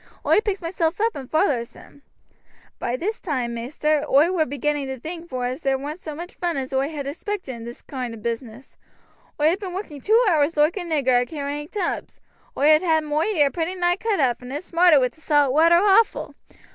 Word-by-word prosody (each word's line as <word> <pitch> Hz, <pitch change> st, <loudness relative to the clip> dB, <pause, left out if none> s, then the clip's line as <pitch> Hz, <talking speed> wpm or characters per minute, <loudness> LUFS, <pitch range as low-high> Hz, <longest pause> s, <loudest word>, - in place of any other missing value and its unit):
Oi -, -, +5 dB
picks 405 Hz, -4 st, -3 dB
myself 330 Hz, 0 st, -1 dB
up 450 Hz, +1 st, +1 dB
and 265 Hz, -2 st, -8 dB
vollers 285 Hz, -8 st, +1 dB
him. 285 Hz, -, -16 dB, 0.8 s
By 245 Hz, -, -2 dB
this 430 Hz, -, -3 dB
toime, 255 Hz, -8 st, -2 dB
maister, 290 Hz, +5 st, -1 dB
oi 295 Hz, +6 st, +5 dB
war 330 Hz, -4 st, +1 dB
beginning 285 Hz, +1 st, -2 dB
vor 265 Hz, -, -4 dB
to -, -, -15 dB
think 335 Hz, +4 st, -8 dB
as 255 Hz, +3 st, -3 dB
there 270 Hz, -2 st, +1 dB
warn't 295 Hz, +5 st, -6 dB
so 310 Hz, -4 st, -7 dB
mooch 345 Hz, +3 st, -8 dB
vun 345 Hz, -4 st, -1 dB
as 265 Hz, 0 st, -4 dB
oi 270 Hz, +2 st, +1 dB
had 295 Hz, -3 st, -5 dB
expected 340 Hz, +1 st, -5 dB
in 230 Hz, -1 st, -9 dB
this 235 Hz, +1 st, -9 dB
koind 250 Hz, -4 st, -5 dB
o' -, -, -10 dB
business. 230 Hz, +2 st, -6 dB, 0.6 s
Oi 300 Hz, +1 st, +4 dB
had 370 Hz, -, -2 dB
been 375 Hz, -3 st, -6 dB
working 315 Hz, -8 st, -6 dB
two 440 Hz, -, +4 dB
hours 315 Hz, -3 st, +2 dB
loike 300 Hz, +5 st, +3 dB
a -, -, -1 dB
nigger 285 Hz, -8 st, +2 dB
a -, -, -1 dB
carrying 290 Hz, +1 st, -5 dB
tubs. 410 Hz, +4 st, -4 dB, 0.4 s
Oi 290 Hz, +2 st, +4 dB
had 310 Hz, 0 st, +6 dB
had 320 Hz, -3 st, +2 dB
moi 300 Hz, 0 st, 0 dB
ear 305 Hz, -10 st, +2 dB
pretty 340 Hz, +2 st, -2 dB
nigh 350 Hz, -1 st, +2 dB
cut 430 Hz, -1 st, -1 dB
off, 250 Hz, -4 st, +1 dB
and 250 Hz, +1 st, -9 dB
it 290 Hz, +5 st, -4 dB
smarted 340 Hz, -3 st, +5 dB
wi' 250 Hz, -, +2 dB
the 315 Hz, -, -21 dB
salt 290 Hz, -4 st, +3 dB
water 330 Hz, +3 st, +5 dB
awful. 405 Hz, +4 st, +3 dB
300 Hz, 220 wpm, -23 LUFS, 265-350 Hz, 0.8 s, had